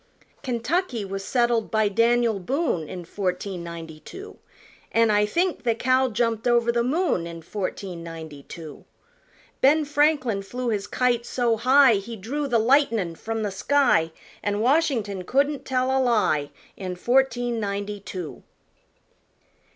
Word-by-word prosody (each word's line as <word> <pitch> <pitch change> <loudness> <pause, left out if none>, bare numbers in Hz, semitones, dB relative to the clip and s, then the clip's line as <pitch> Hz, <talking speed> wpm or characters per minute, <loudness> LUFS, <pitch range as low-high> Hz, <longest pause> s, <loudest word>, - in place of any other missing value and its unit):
Kentucky 250 - -1
was 195 0 -5
settled 235 0 +1
by 220 -1 +2
Daniel 230 +1 +2
Boone 190 - -1
In 180 -2 -7
fourteen 180 0 -3
ninety 165 -2 -8
two, 390 - -11 0.5
An' 230 -1 +3
I 210 0 +3
think 350 - 0
the 230 -2 +1
cow 255 +2 +2
jumped 230 0 -1
over 235 -1 +3
the 235 0 +1
moon 265 - 0
In 165 -1 -9
fourteen 185 -2 -5
ninety 160 -3 -8
two. 155 +1 -10 0.8
Ben 300 +3 +4
Franklin 290 -7 +2
flew 245 +5 -4
his 205 -2 -2
kite 245 -2 +1
so 240 -1 0
high 255 0 +5
He 220 +4 -6
drew 270 +9 -3
the 240 -3 +2
lightnin' 230 - +2
from 225 +6 -4
the 205 - -2
sky, 195 -6 +2 0.3
An' 205 0 -1
Washington 235 - +1
couldn't 280 +7 0
tell 260 0 0
a 265 - +3
lie, 210 - +2 0.3
In 185 -2 -5
fourteen 245 +2 +1
ninety 205 0 -3
two. 185 -4 -7
230 Hz, 145 wpm, -24 LUFS, 195-255 Hz, 0.8 s, high